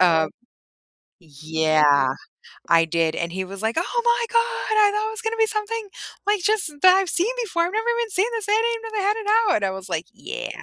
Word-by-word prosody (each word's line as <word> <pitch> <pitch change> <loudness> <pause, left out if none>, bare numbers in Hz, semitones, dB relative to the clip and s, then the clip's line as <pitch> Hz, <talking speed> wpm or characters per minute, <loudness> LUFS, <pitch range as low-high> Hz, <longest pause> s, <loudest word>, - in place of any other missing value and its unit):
uh 165 -3 +4 0.9
yeah, 155 -3 +1 0.6
I 165 -1 +5
did, 165 0 0
and 170 0 -3
he 190 +1 -3
was 195 +2 -9
like, 225 +4 -1
"Oh 470 +8 -1
my 475 0 +2
god! 465 - +3 0.5
I 410 - +2
thought 425 +1 -1
it - - -4
was 445 +1 -7
gonna 450 0 -2
be 445 - +4
something, 430 0 -3 0.4
like, 415 -3 +2
just 420 -7 +1
that 370 0 +8
I've 385 -1 +1
seen 375 +9 +1
before, 345 -6 -1
I've 350 - -3
never 440 +2 -2
even 465 -2 -2
seen 385 +3 +2
this, 430 -3 -4
I - - +2
didn't 460 +2 +2
even 455 - -7
know 425 - -1
they - - -2
had 420 - +1
it 435 0 +2
out!" - - +3
And 205 - -1
I 195 - +1
was 190 0 -7
like, 165 -1 -3
"Yeah. 435 - -6
375 Hz, 235 wpm, -22 LUFS, -, 0.9 s, that